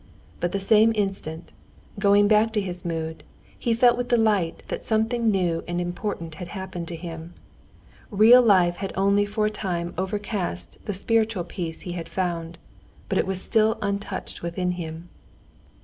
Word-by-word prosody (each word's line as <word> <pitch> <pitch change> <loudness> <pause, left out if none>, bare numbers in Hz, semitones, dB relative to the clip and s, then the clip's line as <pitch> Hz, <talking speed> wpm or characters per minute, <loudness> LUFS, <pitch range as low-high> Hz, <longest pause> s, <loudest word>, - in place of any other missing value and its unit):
But 175 - -1
the 200 - -1
same 215 +3 +5
instant, 195 -5 -3 0.5
going 205 0 +5
back 215 +1 +4
to 215 - +2
his 180 -3 -4
mood, 160 -1 -4 0.4
he 235 - 0
felt 240 +1 +5
with 245 - -2
delight 215 -8 +1
that - - -4
something 225 +1 +1
new 180 -5 +1
and 175 0 -2
important 175 -1 -4
had 180 - -5
happened 185 -2 -6
to 170 - -5
him. 165 0 -8 0.7
Real 225 +4 +7
life 185 -6 +4
had 195 - -4
only 200 +1 +3
for 210 +1 0
a 215 - +1
time 175 -5 -3
overcast 190 - -3
the 205 - -2
spiritual 220 -1 +1
peace 170 -1 -6
he 180 - -6
had 170 -1 -6
found, 170 -2 -3 0.5
but 190 - +1
it - - 0
was 190 -1 -3
still 220 -1 +2
untouched 200 -1 -4
within 180 +1 -2
him. 165 -1 -6
190 Hz, 165 wpm, -25 LUFS, 175-210 Hz, 0.7 s, Real